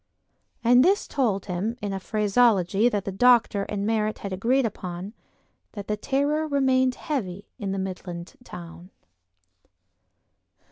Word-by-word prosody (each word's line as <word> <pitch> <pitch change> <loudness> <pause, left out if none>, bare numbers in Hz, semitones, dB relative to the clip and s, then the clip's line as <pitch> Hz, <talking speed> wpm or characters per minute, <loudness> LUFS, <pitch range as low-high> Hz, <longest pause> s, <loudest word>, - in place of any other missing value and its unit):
And 245 +2 +6
this 390 +5 +2
told 220 -9 0
him, 205 +5 -3
in 205 -4 -3
a 195 - -3
phraseology 210 0 +2
that 205 -4 -2
the 195 - -3
doctor 230 -1 +4
and 205 -1 -3
Merritt 215 -1 0
had 200 -2 -6
agreed 245 +7 +1
upon, 185 -1 -5 0.6
that 205 -2 -7
the 210 - 0
terror 285 +6 0
remained 260 -3 +2
heavy 200 - -4
in 200 -3 -3
the 195 - -2
Midland 180 -2 -6
town. 175 -3 -10
210 Hz, 135 wpm, -25 LUFS, 190-250 Hz, 0.6 s, And